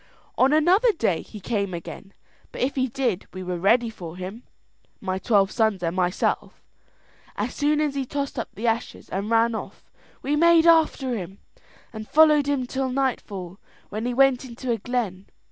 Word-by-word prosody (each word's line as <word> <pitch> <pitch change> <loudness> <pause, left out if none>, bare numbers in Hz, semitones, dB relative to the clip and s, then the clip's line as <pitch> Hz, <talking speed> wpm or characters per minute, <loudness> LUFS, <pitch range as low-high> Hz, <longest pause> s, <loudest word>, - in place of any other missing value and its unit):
"On 265 +2 +4
another 360 +10 +4
day 220 - 0
he 210 - -11
came 200 -3 -2
again; 195 +3 -9 0.4
but - - -7
if 265 +3 +1
he 260 -1 0
did, 240 -6 -2
we 185 0 -6
were 180 -1 -3
ready 230 +6 +3
for 175 -5 -9
him, 190 +5 -7 0.6
my 190 -1 -3
twelve 200 -2 +2
sons 220 -5 +1
and 170 +1 -1
myself. 180 0 -1 0.7
As - - -3
soon 295 +1 +1
as 300 -2 0
he 275 -1 -2
tossed 280 +1 -4
up - - -4
the 225 - -5
ashes 230 +1 -2
and 200 +3 -3
ran 230 0 +3
off, 220 - -8 0.3
we 290 +2 0
made 335 +1 +5
after 310 -6 +3
him, 190 -2 -6 0.6
and 215 -1 -7
followed 300 -2 +5
him 280 -3 0
till 265 +1 -2
nightfall, 205 -9 -3 0.3
when 215 +3 -3
he 245 - -1
went 270 -1 +4
into 250 0 -5
a 230 - 0
glen. 210 -5 -3
235 Hz, 180 wpm, -24 LUFS, 195-275 Hz, 0.7 s, made